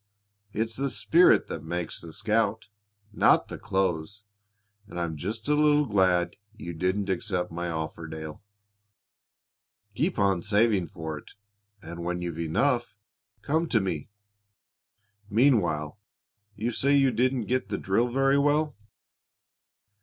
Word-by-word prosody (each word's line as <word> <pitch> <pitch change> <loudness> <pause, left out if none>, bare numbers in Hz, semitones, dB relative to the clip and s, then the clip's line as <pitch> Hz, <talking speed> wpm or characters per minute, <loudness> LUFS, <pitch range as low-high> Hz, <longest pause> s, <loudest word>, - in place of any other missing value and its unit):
It's 110 +2 -2
the 140 +1 0
spirit 170 +6 +4
that 80 - -6
makes 85 0 -3
the 85 - -9
scout, 110 +2 0 0.4
not - - +4
clothes, 95 +1 -1 0.6
and 90 - -7
I'm 85 -2 -2
just 105 - -5
a 150 - +3
little 150 0 +4
glad 95 -6 +2 0.2
you 85 -6 -6
didn't 95 +4 -1
accept 90 -2 -2
my 85 +1 -3
offer, 80 0 -4
Dale. 80 -1 -7 1.5
Keep 165 - -1
on 100 -4 +2
saving 105 -2 +2
for 80 -5 -6
it, - - -17 0.5
and, 85 +1 -7
when 90 +1 -2
you've 85 -2 -5
enough, 120 - 0 0.5
come 160 +3 0
to 115 - +3
me. 90 -5 -3 1.2
Meanwhile 100 - +2 0.6
you 110 +4 -2
say 140 +4 +2
you 135 -2 +4
didn't 125 0 +1
get 130 +3 -1
the - - -2
drill 105 +6 +1
very 135 +2 +3
well?" 150 +1 +2
100 Hz, 130 wpm, -27 LUFS, 85-125 Hz, 1.5 s, spirit